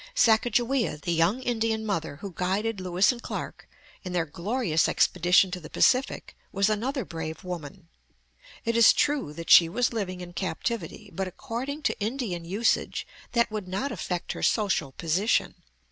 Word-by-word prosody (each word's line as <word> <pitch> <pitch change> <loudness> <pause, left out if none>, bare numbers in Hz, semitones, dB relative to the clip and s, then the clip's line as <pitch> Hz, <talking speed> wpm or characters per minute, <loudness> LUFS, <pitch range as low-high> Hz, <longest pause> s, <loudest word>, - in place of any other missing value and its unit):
Sacajawea, 240 - +2
the 170 +3 -2
young 175 +10 +2
Indian 225 -2 0
mother 165 -8 -2
who 195 +5 -8
guided 195 +4 -1
Lewis 185 +3 +3
and 240 -1 -8
Clark - - -6 0.3
in 185 -2 -5
their 175 -2 +1
glorious 170 - 0
expedition 180 +2 +3
to 180 - -4
the 155 - -11
Pacific, 255 +1 +1 0.2
was 200 +2 +2
another 250 +3 -1
brave 160 -2 -6
woman. 175 -1 -7 0.8
It 230 0 0
is 230 -1 +7
true 290 - 0
that 165 +2 -5
she 165 -2 +9
was 245 +7 0
living 185 -5 -3
in 175 -1 -9
captivity, 195 +3 -4
but 190 -1 -2
according 270 - -5
to - - 0
Indian 215 -5 -3
usage 205 +7 0 0.3
that 235 -2 +2
would 210 -3 -4
not 195 +10 -2
affect 180 -2 -3
her - - -6
social 195 - +1
position. 175 - +1
195 Hz, 160 wpm, -27 LUFS, 175-230 Hz, 0.8 s, she